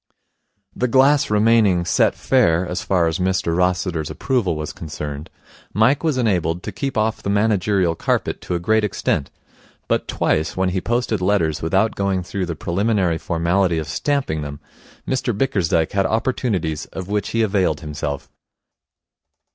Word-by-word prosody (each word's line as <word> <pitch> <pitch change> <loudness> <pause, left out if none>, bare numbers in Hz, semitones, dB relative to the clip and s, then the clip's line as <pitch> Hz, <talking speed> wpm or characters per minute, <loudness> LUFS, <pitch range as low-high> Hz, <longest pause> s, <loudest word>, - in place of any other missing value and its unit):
The 125 - 0
glass 140 +3 +4
remaining 105 -4 +3
Set - - +2
Fair 95 -10 +2
as 90 - -3
far 90 -3 +1
as 80 +3 -1
Mr 90 -2 0
Rossiter's 90 -3 0
approval 120 - 0
was 75 -1 -5
concerned, 75 -2 -6 0.5
Mike 120 - +3
was 155 -5 +1
enabled 90 -7 0
to - - -5
keep 135 -4 -4
off 110 +1 0
the - - -3
managerial 100 -4 +2
carpet - - -1
to 90 - -3
a - - -1
great 110 +5 +2
extent; 95 -8 -1 0.6
but - - 0
twice, 80 +3 0
when 95 0 +2
he 95 0 -1
posted 120 -3 -1
letters 90 -5 +1
without 95 +7 +1
going 95 -2 -1
through 95 +1 -3
the 85 - -3
preliminary 90 0 0
formality 85 +1 +1
of 80 -1 -3
stamping 80 - -1
them, 70 -1 -6 0.5
Mr 125 -4 -1
Bickersdyke 90 - +1
had 95 -1 +1
opportunities 110 - -1
of 95 -1 -7
which 105 0 -1
he 115 0 +1
availed 95 -4 +1
himself. 75 -2 -4
95 Hz, 155 wpm, -21 LUFS, 85-110 Hz, 0.6 s, glass